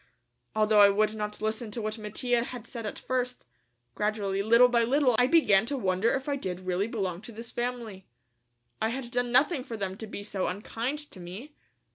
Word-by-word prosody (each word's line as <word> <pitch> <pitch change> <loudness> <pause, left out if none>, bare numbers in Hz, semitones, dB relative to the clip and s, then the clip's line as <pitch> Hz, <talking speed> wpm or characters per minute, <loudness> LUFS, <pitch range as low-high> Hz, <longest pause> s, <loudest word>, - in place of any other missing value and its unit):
Although 215 0 +4
I 200 -1 +9
would 215 +2 +2
not 210 0 -5
listen 220 +1 -2
to 215 - -4
what 215 +1 -3
Mattia 235 +3 0
had 245 -2 -7
said 235 -3 -6
at - - -5
first, 250 -1 -2 0.5
gradually, 205 - -1
little 235 +4 +6
by 240 -1 +3
little, 255 0 +3
I 245 - +5
began 225 -9 +4
to 280 - -2
wonder 190 0 +1
if 265 +1 -4
I 285 -1 0
did 185 -8 -4
really 185 +2 -1
belong 195 -6 -3
to 220 - -10
this 230 +1 -9
family. 240 -6 -4 0.7
I 220 - +2
had 245 0 -5
done 245 -1 0
nothing 275 +4 +3
for 235 -3 -6
them 190 -2 -3
to 220 - -7
be 205 -1 -7
so 200 -2 -2
unkind 225 +8 -3
to - - -12
me. 195 - -9
220 Hz, 200 wpm, -28 LUFS, 205-245 Hz, 0.7 s, I